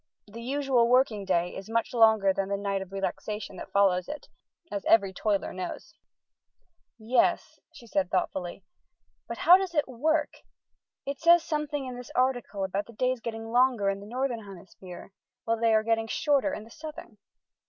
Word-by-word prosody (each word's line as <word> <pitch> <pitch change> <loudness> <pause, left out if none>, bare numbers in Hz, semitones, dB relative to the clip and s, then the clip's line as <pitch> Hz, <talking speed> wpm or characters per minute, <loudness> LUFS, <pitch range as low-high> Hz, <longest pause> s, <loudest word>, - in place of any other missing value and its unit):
The 220 +3 -10
usual 265 -1 +1
working 240 -5 +3
day 180 -2 0
is 195 +3 -8
much 230 +2 -1
longer 220 -4 +5
than 195 0 -2
the 200 - 0
night 200 -1 -2
of 190 -1 -9
relaxation 195 +2 -4
that - - -9
follows 185 -3 +3
it, 300 - -8 0.4
as 200 -1 -3
every 200 -4 +4
toiler 200 +1 -1
knows." 185 +3 -6 1.0
"Yes," 235 +2 +1
she 235 - -14
said 195 -5 -1
thoughtfully, 185 0 -2 0.6
"but - - -6
how 355 +2 +7
does 380 -3 -4
it 295 - +2
work? 300 +5 0 0.7
It 280 0 -4
says 340 +1 +6
something 300 -2 -2
in 250 -1 -6
this 250 - -9
article 245 -6 0
about 195 +2 -2
the 235 - -13
days 255 +1 -1
getting 225 0 -6
longer 245 -5 +3
in 195 - -5
the 200 - -11
Northern 245 -1 -2
Hemisphere, 185 -1 -12 0.3
while 230 0 -1
they 230 0 +3
are 220 0 +3
getting 225 0 0
shorter 290 +4 +1
in 215 - -5
the 225 - -16
Southern." 305 -8 -10
225 Hz, 175 wpm, -28 LUFS, 195-255 Hz, 1.0 s, how